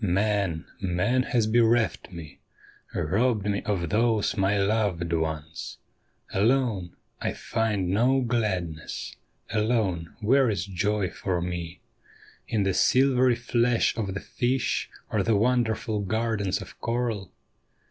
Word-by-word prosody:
' - - -8 0.2
Man, 100 -7 0 0.2
man 95 +7 +1
has 120 -3 +1
bereft 115 -1 +2
me, 80 -5 -10 0.6
robbed 105 +5 +1
me 100 -1 0
of 100 -4 0
tliose 105 +3 +1
my 100 0 +2
loved 100 -4 0
ones; 80 -1 -3 0.6
Alone, 110 -4 +1 0.3
I - - -1
find 110 -5 -1
no 125 +6 +3
gladness; 95 -10 -2 0.4
alone, 105 -7 0
where 130 +4 +4
is 95 -4 -1
joy 100 0 -1
for 90 -2 -2
me 85 0 -5 0.7
In 110 -3 +1
the 95 -1 +1
silvery 130 +2 +4
flash 120 0 +1
of 100 -4 -3
the - - -3
fish 125 +1 -1 0.2
or - - +1
tlie 110 -2 +2
wonderful 110 -1 +1
gardens 105 -1 -1
of - - -15
coral? 115 -5 -2
105 Hz, 125 wpm, -26 LUFS, 95-115 Hz, 0.7 s, where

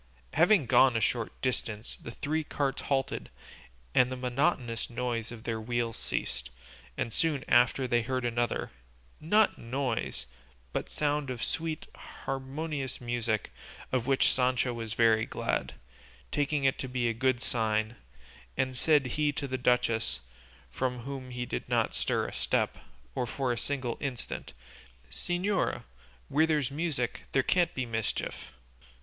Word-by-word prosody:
Having 175 0 +5
gone 125 0 +6
a - - +2
short 115 0 0
distance 115 -4 -2
the - - -7
three 150 +6 -1
carts 140 -2 -1
halted 135 -2 -1 0.6
and 125 0 +5
the - - -1
monotonous 125 -2 0
noise 120 -2 -2
of 115 -2 -9
their 115 -1 -2
wheels 120 0 -1
ceased, 65 +2 -3 0.5
and 115 - -1
soon 150 -3 +1
after 125 +2 +4
they 120 -1 +3
heard 130 +1 -1
another, 120 0 0 0.5
not 210 +7 +3
noise, 120 - -2 0.5
but - - -2
sound 145 -2 0
of 125 -3 -3
sweet, 160 -1 -2 0.4
harmonious 135 0 -3
music, 120 -3 -1 0.4
of 125 -1 0
which 135 -1 +4
Sancho 125 -1 +2
was 115 -1 -4
very 115 -1 +4
glad, - - -1 0.6
taking 145 0 +1
it 135 -1 +3
to 130 - -2
be 125 -1 0
a 115 - +1
good 130 +1 +2
sign; 110 -2 0 0.6
and 130 0 +1
said 150 +1 +4
he 145 +4 +1
to 145 0 -3
the 130 - -2
duchess, 120 - +2 0.5
from 125 -1 -1
whom 135 0 -6
he 125 0 -3
did 60 - -4
not - - +2
stir - - 0
a - - -7
step, - - 0 0.3
or 125 - -1
for 130 +1 -1
a - - +1
single 125 0 -2
instant, 135 -5 -4 0.6
"Señora, 180 - 0 0.4
where 155 +3 +4
there's 150 -5 +1
music 145 -5 -1
there 135 - +4
can't 175 +2 +2
be 130 - -1
mischief." 110 -3 -3
125 Hz, 145 wpm, -30 LUFS, 115-140 Hz, 0.6 s, gone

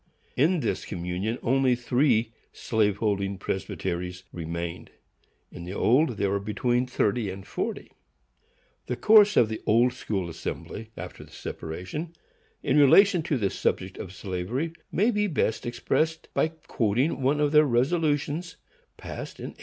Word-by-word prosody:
In 160 +5 +3
this - - -1
communion 90 +6 -3
only 130 0 +3
three 120 -2 +1 0.2
slave 105 -3 0
holding 100 -3 -1
presbyteries 90 -1 -4
remained. 85 0 -5 0.6
In 85 - -9
the 90 +2 -6
old 125 +1 +3
there 100 -1 +1
were 100 - +1
between 120 +5 0
thirty 110 -3 0
and 95 +1 -7
forty. - - -4 1.0
The 125 - -1
course 210 - +6
of 115 - +6
the 110 0 -5
Old 120 +3 +4
School 100 -7 -3
Assembly, 105 +6 -6
after - - -8
the - - -16
separation, 95 - -6 0.5
in - - +3
relation 180 +6 +6
to 155 -3 -1
the 100 -5 0
subject 95 0 -2
of 90 - -6
slavery, 100 - -3 0.2
may 215 +6 +3
be 210 -1 +1
best 120 - -1
expressed 160 +6 -1
by - - +2
quoting 135 -4 -1
one 140 +3 +2
of 150 -1 +2
their 150 0 +6
resolutions, 145 +5 0 0.4
passed - - -7
in - - -5
1845. - - -30
120 Hz, 145 wpm, -26 LUFS, 100-150 Hz, 1.0 s, course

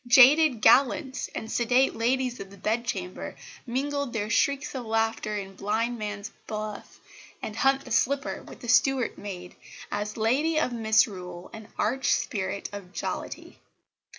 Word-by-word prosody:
Jaded 265 +1 +7
gallants 265 0 +4
and 220 - -5
sedate 245 +3 +3
Ladies 250 +2 0
of 195 - -7
the 200 - -14
Bedchamber 210 -3 -3 0.3
mingled 280 +1 -2
their 215 -1 -2
shrieks 280 +4 +1
of 260 -3 -4
laughter 225 -1 0
in 195 -1 -6
blind 225 +5 -1
man's 210 -1 -5 0.2
buff 215 -1 -6 0.4
and 215 - -6
hunt 270 +3 +2
the 250 - -10
slipper 275 +5 +1
with - - -13
the 240 - -8
Stuart 250 +1 +3
maid 180 -3 -7 0.4
as 210 +1 -3
Lady 280 +9 +2
of 255 - 0
Misrule 200 -6 +1
and 220 -1 -9
arch 255 +3 +1
spirit 195 -1 -2
of 200 -3 -8
jollity. - - -5
230 Hz, 145 wpm, -27 LUFS, 210-260 Hz, 0.4 s, Jaded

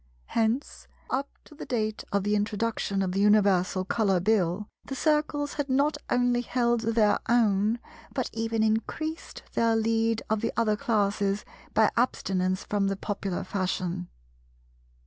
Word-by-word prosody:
Hence, 230 +5 -1 0.2
up 275 +2 -1 0.2
to - - -15
the 300 - -9
date 215 -3 -1
of 200 -1 +1
the 205 +1 +1
introduction 210 -1 -1
of 185 - -1
the 195 - -1
Universal 195 -3 +3
Colour 195 -2 +2
Bill, 195 0 +1 0.2
the 270 - -6
Circles 300 -1 +1
had 290 -2 -3
not 280 +4 +2
only 245 0 +2
held 240 -1 +1
their 225 -2 +2
own, 220 -2 +3 0.3
but 260 -3 -2
even 225 0 0
increased 310 +9 -2
their 230 -1 +2
lead 225 0 +1
of 215 -1 0
the - - -1
other 220 -2 +2
classes 205 -4 0 0.3
by 220 0 +5
abstinence 185 -6 0
from 205 -1 0
the 195 0 -1
popular 195 -2 -3
fashion. 185 -2 -2
220 Hz, 145 wpm, -27 LUFS, 200-235 Hz, 0.3 s, by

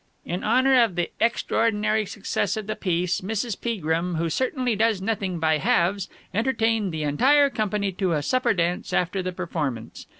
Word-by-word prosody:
"'In 175 +2 -4
honour 255 +3 +4
of 220 -7 +1
the 175 -1 -1
extraordinary 220 -2 +1
success 215 +2 -2
of 215 - -4
the 215 - -3
piece, 180 -1 -1
Mrs. 220 +3 -2
Peagrim, 175 -6 -1
who 165 0 -1
certainly 255 - 0
does 220 -1 +2
nothing 195 -3 -2
by 160 -1 +1
halves, 180 +6 +1 0.2
entertained 225 -2 +1
the 155 -1 -3
entire 275 - +4
company 210 -3 -1
to 185 -1 -1
a 150 -2 -1
supper 255 - +1
dance 175 0 -1
after 180 +2 0
the 185 0 -3
performance. 150 -10 -4
195 Hz, 165 wpm, -24 LUFS, 175-225 Hz, 0.2 s, honour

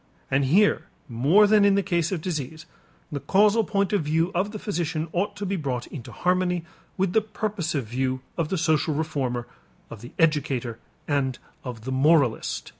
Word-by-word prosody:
And 135 +1 +2
here 200 +10 +3 0.2
more 140 - +4
than 210 0 +5
in 200 -1 +5
the 200 - +2
case 170 -3 0
of 180 -4 -2
disease, 155 -3 -4 0.5
the 145 - -3
causal 210 +7 +3
point 200 -2 0
of 205 - +2
view 160 +4 +1
of 190 +3 0
the 215 - -5
physician 170 -6 -2
ought 200 +4 -1
to 205 - -5
be 195 +1 -1
brought 130 -8 -3
into 120 -4 -9
harmony 180 0 0 0.3
with 190 -1 0
the 220 - +4
purposive 205 - -3
view 130 +3 -2
of 165 -3 -1
the 190 - -1
social 155 -2 +1
reformer, 135 -6 -2 0.5
of 110 - -9
the 120 - -11
educator 140 -7 +1 0.3
and 135 -4 0 0.3
of 125 -4 -6
the 130 +4 -5
moralist. 135 -2 +2
160 Hz, 180 wpm, -25 LUFS, 135-195 Hz, 0.5 s, than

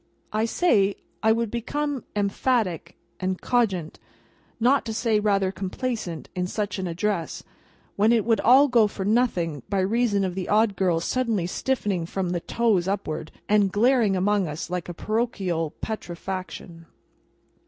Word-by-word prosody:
—I 215 +1 +1
say 215 - +2 0.3
I 220 - +4
would 230 -1 0
become 280 +3 -2
emphatic 200 - 0 0.2
and 185 0 -2
cogent, 195 -10 0 0.6
not 255 +4 +3
to 225 -1 -4
say 220 -2 +2
rather 200 -2 +1
complacent, 190 - -4
in 180 0 -2
such 205 0 -3
an 185 - -2
address, 175 0 -2 0.5
when 210 +3 +4
it 230 -3 +3
would 225 -3 +3
all 265 +5 +6
go 235 -5 +4
for 195 -1 -5
nothing 185 - +1
by 200 - 0
reason 205 0 +1
of 185 -2 -1
the 185 0 -4
Odd 210 -1 +3
Girl's 175 -3 +1
suddenly 230 -8 0
stiffening 195 -4 -1
from 185 -1 -2
the 175 - -1
toes 205 -2 +1
upward, 160 -6 -3 0.2
and 205 -2 +3
glaring 225 -1 +3
among 195 0 +1
us 155 +3 -5
like 180 -1 -3
a - - -4
parochial 195 -8 -1
petrifaction. 180 -4 -6
205 Hz, 150 wpm, -25 LUFS, 180-230 Hz, 0.6 s, all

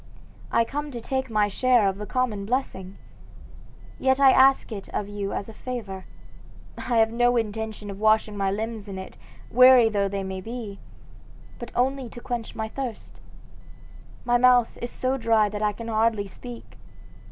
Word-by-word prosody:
I 230 - +3
come 290 +4 -4
to 245 -4 -6
take 265 +2 -3
my 210 -2 +2
share 245 0 +3
of 195 +1 -2
the 210 - -6
common 245 -6 -1
blessing. 200 -7 -3 1.0
Yet 265 0 +2
I 270 -1 +7
ask 265 -1 +4
it 200 -3 -7
of 205 - -3
you 205 -1 -4
as 200 - -4
a 225 - -10
favor. 215 -6 -6 0.7
I 240 - -2
have 225 0 +4
no 245 +1 +3
intention 220 -2 -3
of 195 - -9
washing 215 0 +2
my 195 -1 0
limbs 215 +1 -4
in 190 - -6
it, 190 - -8 0.4
weary 250 -1 +7
though 200 -2 0
they 195 0 -3
be, 200 +2 -6 0.8
but 240 - -8
only 260 0 0
to 240 - -10
quench 240 -2 -5
my 220 0 -3
thirst. 245 -1 -7 1.0
My 240 0 +3
mouth 250 -1 +4
is 240 - -3
so 260 +2 -1
dry 225 -3 +3
that 205 0 -5
I 210 -1 +2
can 230 +3 -9
hardly 220 -2 +1
speak. 240 +4 -11
225 Hz, 170 wpm, -25 LUFS, 205-245 Hz, 1.0 s, I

